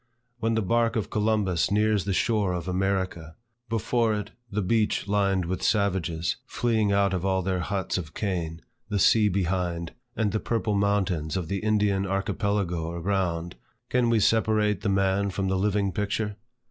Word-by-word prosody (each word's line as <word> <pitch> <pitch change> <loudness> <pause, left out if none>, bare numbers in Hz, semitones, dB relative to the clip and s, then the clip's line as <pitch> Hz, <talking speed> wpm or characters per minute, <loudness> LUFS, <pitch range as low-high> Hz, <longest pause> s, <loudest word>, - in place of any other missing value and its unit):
When 115 0 0
the 110 - +1
bark 115 +3 +1
of 110 - -2
Columbus 105 -5 +1
nears 105 -1 +2
the 100 - -1
shore 105 -2 +1
of 90 -1 -4
America; 95 -3 -1 0.3
before 115 0 +1
it, 105 - -5 0.2
the 105 0 -1
beach 105 +2 +1
lined 100 -3 +1
with 90 +2 -3
savages, 90 -6 0
fleeing 110 -4 +1
out 100 -1 +2
of 90 -2 -1
all 95 -1 +1
their 95 0 0
huts 95 +1 -2
of 80 -3 -9
cane; 85 -5 -3 0.3
the 105 - 0
sea 105 +2 +5
behind; 90 -3 -1 0.2
and 110 -3 0
the 110 - 0
purple 110 -2 -1
mountains 100 -6 0
of 85 -3 -4
the 100 - -1
Indian 105 -2 +1
Archipelago 95 -3 -1
around, 85 -1 -2 0.3
can 125 -1 +3
we 115 -1 +3
separate 105 -2 +2
the 105 - 0
man 95 +1 +2
from 95 0 -2
the 95 - +1
living 100 0 +1
picture? 105 +1 -2
100 Hz, 165 wpm, -26 LUFS, 90-105 Hz, 0.3 s, sea